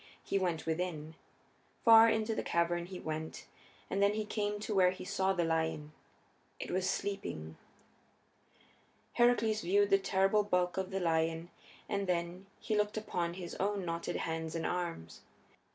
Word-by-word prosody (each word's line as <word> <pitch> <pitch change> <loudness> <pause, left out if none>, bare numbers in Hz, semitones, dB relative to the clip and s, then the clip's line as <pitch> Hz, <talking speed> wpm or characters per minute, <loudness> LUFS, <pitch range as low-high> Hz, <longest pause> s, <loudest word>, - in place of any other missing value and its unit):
He 195 - 0
went 175 -4 -1
within. 160 -2 -3 0.7
Far 225 0 +9
into 220 0 0
the - - -1
cavern 170 0 0
he 185 -1 -7
went, 160 0 -5 0.4
and 195 - -1
then 200 +1 +4
he 215 0 -2
came 210 -1 -2
to 215 - -3
where 185 -2 +5
he 185 0 -6
saw 190 +1 +1
the 180 -3 +1
lion. 160 -2 -1 0.7
It - - -5
was 185 +1 0
sleeping. 195 - -4 1.6
Heracles 230 -3 +3
viewed 200 +3 +2
the 195 - +6
terrible 195 +2 +2
bulk 180 -3 +1
of 190 -1 -1
the 195 - -2
lion, 165 0 0 0.4
and 200 -2 -2
then 175 +2 -2
he 215 - -2
looked 210 0 0
upon 175 -5 -2
his 180 -2 -7
own 200 -1 0
knotted 170 0 -3
hands 160 0 -3
and 165 - -2
arms. 170 - -4
185 Hz, 155 wpm, -33 LUFS, 165-205 Hz, 1.6 s, Far